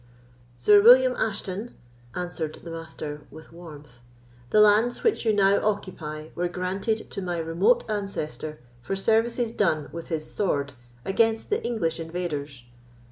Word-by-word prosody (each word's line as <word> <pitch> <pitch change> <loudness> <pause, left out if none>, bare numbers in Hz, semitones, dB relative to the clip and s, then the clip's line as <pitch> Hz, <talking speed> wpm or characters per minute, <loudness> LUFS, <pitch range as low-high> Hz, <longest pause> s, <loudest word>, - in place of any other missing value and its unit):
"Sir 205 +12 +6
William 250 +3 +7
Ashton," 210 +1 -3 0.4
answered 175 -3 -4
the 170 - -8
Master, 155 -2 -7
with 160 +1 -14
warmth, 150 -7 -12 0.5
"the 215 - +4
lands 215 +3 +4
which 450 - +1
you - - +5
now 200 -1 +3
occupy 160 -7 -3
were 175 +1 -1
granted 190 +5 -3
to - - -5
my 175 -2 -3
remote 170 +9 +2
ancestor 195 -7 -4 0.2
for 195 - -3
services 225 +3 +1
done 155 -9 0
with 170 0 -7
his 155 -2 -3
sword 145 -9 -1 0.3
against 225 - +1
the 425 - 0
English 220 -10 -1
invaders. 155 -6 -5
180 Hz, 135 wpm, -25 LUFS, 160-215 Hz, 0.5 s, William